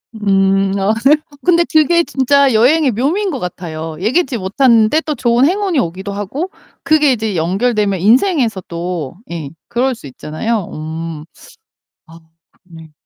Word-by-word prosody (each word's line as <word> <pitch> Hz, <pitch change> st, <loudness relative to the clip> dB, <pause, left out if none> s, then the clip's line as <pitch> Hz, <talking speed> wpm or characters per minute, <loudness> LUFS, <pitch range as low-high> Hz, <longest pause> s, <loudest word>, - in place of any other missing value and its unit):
음. 195 Hz, -1 st, +2 dB
아 195 Hz, +3 st, +1 dB
네. 295 Hz, +3 st, +7 dB, 0.3 s
근데 345 Hz, -1 st, +4 dB
그게 335 Hz, +2 st, +4 dB
진짜 275 Hz, -1 st, +2 dB
여행의 265 Hz, +5 st, +3 dB
묘미인 320 Hz, -, 0 dB
것 270 Hz, -7 st, -4 dB
같아요. 165 Hz, -3 st, -6 dB
예기치 255 Hz, -, 0 dB
못하는데 230 Hz, +7 st, +3 dB
또 305 Hz, -2 st, -3 dB
좋은 240 Hz, +2 st, +2 dB
행운이 375 Hz, -3 st, +1 dB
오기도 190 Hz, +1 st, -4 dB
하고 260 Hz, -, -4 dB, 0.3 s
그게 305 Hz, -3 st, +3 dB
이제 220 Hz, -5 st, -2 dB
연결되면 200 Hz, +3 st, 0 dB
인생에서 235 Hz, -, +2 dB
또 170 Hz, -4 st, -5 dB, 0.2 s
예 160 Hz, -5 st, -5 dB, 0.2 s
그럴 250 Hz, +2 st, 0 dB
수 145 Hz, -, -12 dB
있잖아요. 175 Hz, -, -4 dB
음. 160 Hz, 0 st, -6 dB, 0.8 s
아 165 Hz, -, -15 dB, 0.5 s
음 165 Hz, -, -14 dB
네. 160 Hz, -1 st, -14 dB
220 Hz, 285 characters per minute, -16 LUFS, 180-280 Hz, 0.8 s, 네